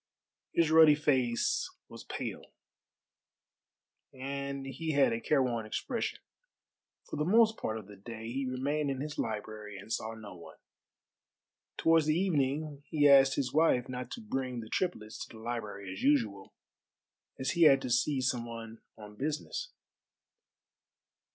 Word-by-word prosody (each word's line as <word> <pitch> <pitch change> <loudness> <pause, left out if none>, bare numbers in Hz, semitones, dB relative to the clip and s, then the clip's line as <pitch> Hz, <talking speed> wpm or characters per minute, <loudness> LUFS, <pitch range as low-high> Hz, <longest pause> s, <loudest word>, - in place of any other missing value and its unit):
His 165 -2 +3
ruddy 160 -2 +8
face 130 -6 +1 0.2
was - - -11
pale, - - -5 1.6
and 140 +1 -5
he 155 +4 -3
had 140 -4 +4
a 115 - -3
careworn 125 -5 +1
expression. 235 - -2 0.9
For - - -7
the 150 - +1
most 220 +5 +5
part 110 - -3
of 110 - -8
the 100 0 -13
day 110 +3 -7
he 135 +1 -2
remained 140 +3 -1
in 135 -1 -2
his 150 +2 -5
library 105 -1 -4
and 100 +4 -6
saw 110 +1 -3
no 110 -3 -10
one. 85 - -13 1.2
Towards 165 -2 +4
the 155 +1 +3
evening 150 -4 0
he 145 -2 +3
asked 135 -1 +7
his 135 -3 -1
wife 150 -6 +3
not 125 -1 -5
to 235 - -7
bring 130 - -3
the 110 - -10
triplets 110 -13 -2
to 115 - -13
the 110 - -12
library 105 -5 -5
as 95 - -8
usual, 110 -9 +1 0.9
as 130 -1 0
he 170 -1 +4
had 135 -3 +7
to 125 - -3
see 130 +3 +2
some 125 -2 0
one 115 -1 -8 0.2
on 105 -1 -11
business. 155 - -3
130 Hz, 150 wpm, -31 LUFS, 115-150 Hz, 1.6 s, ruddy